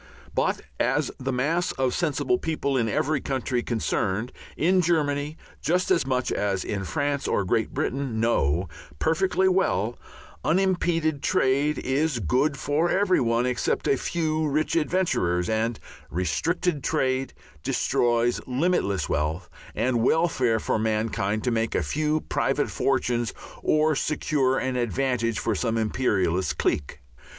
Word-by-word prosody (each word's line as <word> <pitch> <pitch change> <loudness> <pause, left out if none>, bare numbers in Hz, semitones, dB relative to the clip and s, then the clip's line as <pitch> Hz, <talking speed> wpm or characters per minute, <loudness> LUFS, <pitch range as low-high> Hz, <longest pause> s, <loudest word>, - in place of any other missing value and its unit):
But - - 0 0.2
as 135 +4 +1
the 130 0 -2
mass 160 +8 0
of 130 -1 0
sensible 370 - 0
people 145 -4 -1
in 115 -3 +1
every 140 +6 0
country 130 -2 -1
concerned, 110 -1 -1 0.3
in 185 +4 +3
Germany 150 -3 0 0.2
just 180 +3 +1
as 170 -7 +2
much 130 -1 0
as 100 -2 0
in 100 -2 -3
France 145 - -1
or 100 - +1
Great 110 +5 0
Britain, 130 -4 -2
know 90 -7 +1 0.3
perfectly 185 - +2
well, 120 - +1 0.4
unimpeded 170 -4 +1
trade 145 -3 +2
is 140 +1 0
good 130 - +1
for 150 +5 +1
every 185 0 +3
one 115 0 +1
except 125 -1 0
a - - +4
few 155 +2 -1
rich 150 +3 0
adventurers, 150 - +1
and 110 +1 0 0.3
restricted 145 - -1
trade 130 -4 0 0.3
destroys 120 +7 +1
limitless 125 - 0
wealth 80 +4 -2 0.2
and 120 -2 +1
welfare 130 -5 +2
for 110 - -1
mankind 110 -1 -1
to 125 - +1
make 115 -1 0
a - - +1
few 150 - 0
private - - 0
fortunes 120 -4 0 0.3
or 155 0 +3
secure 135 -2 +1
an 130 -1 -1
advantage 120 -1 0
for - - 0
some 115 -2 -1
imperialist 95 - 0
clique. 70 -2 -1
130 Hz, 135 wpm, -25 LUFS, 115-155 Hz, 0.4 s, a